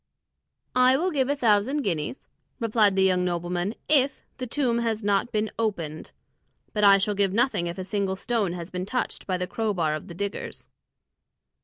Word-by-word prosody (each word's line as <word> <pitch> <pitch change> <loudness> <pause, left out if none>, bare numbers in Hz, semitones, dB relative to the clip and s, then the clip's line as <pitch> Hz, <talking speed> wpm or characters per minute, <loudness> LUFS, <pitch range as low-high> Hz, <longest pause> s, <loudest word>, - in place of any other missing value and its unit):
"I 255 +1 +5
will 365 +5 0
give 270 -4 +1
a 285 - +2
thousand 245 +3 +2
guineas," 170 - -3 0.3
replied 215 -4 +3
the 190 - +3
young 185 -1 +3
nobleman, 175 +3 -2
"if 280 -2 +3
the 255 - -5
tomb 240 -2 0
has 225 -2 -1
not 205 +3 +1
been 215 0 -1
opened; 170 -9 -3 0.6
but 210 - 0
I 200 -1 +8
shall 200 +2 0
give 195 -1 +1
nothing 230 -6 +1
if 170 +2 -5
a 185 - -4
single 195 0 -1
stone 205 -2 -1
has 175 -1 -7
been 185 +1 -4
touched 250 +4 -3
by 185 -2 0
the 180 - -2
crow 215 +2 -2
bar 160 -4 +1
of 155 +4 -5
the 170 - -9
diggers." 200 +2 -5
205 Hz, 185 wpm, -25 LUFS, 180-235 Hz, 0.6 s, I